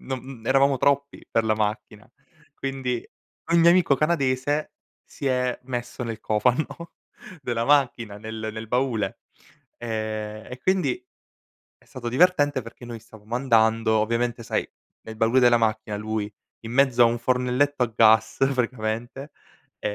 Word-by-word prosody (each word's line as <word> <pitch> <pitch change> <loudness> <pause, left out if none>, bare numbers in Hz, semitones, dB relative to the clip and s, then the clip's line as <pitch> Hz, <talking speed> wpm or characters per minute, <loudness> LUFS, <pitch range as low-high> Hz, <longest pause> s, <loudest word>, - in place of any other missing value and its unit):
non 130 -1 -4
n 130 -3 -10
n - - -13
eravamo 135 +1 +3
troppi 140 +1 0
per 115 - +1
la 110 -1 +2
macchina. 105 0 -3 0.5
Quindi, 130 -4 -3 0.5
ogni 170 0 +6
amico 170 -5 +4
canadese 145 -2 0 0.3
si 140 - -8
è 125 -1 0
messo 120 -1 -5
nel 115 -1 -5
cofano 125 +11 -1 0.5
della 115 -2 -1
macchina, 120 -7 +2
nel 110 0 -5
nel 110 0 -7
baule. 125 -3 -1 0.6
Ehm, 110 -2 -4
e 125 - -7
quindi 190 - 0 0.7
è - - -27
stato 125 -3 -7
divertente 145 -1 +3
perché 115 +2 -12
noi 120 -1 -8
stavamo 110 0 -10
andando, 115 -3 +3
ovviamente 115 +2 -1
sai, - - -2 0.3
nel 110 0 -9
baule 115 +4 +3
della 120 -1 +6
macchina 110 -2 -1
lui, 105 0 -3 0.3
in 115 0 -8
mezzo 130 -2 +4
a 120 - +8
un 120 +1 0
fornelletto 125 +3 +1
a 115 - -7
gas 110 0 +4 0.2
praticamente, 120 +3 -3 0.5
e 105 - -2
120 Hz, 145 wpm, -24 LUFS, 110-135 Hz, 0.7 s, a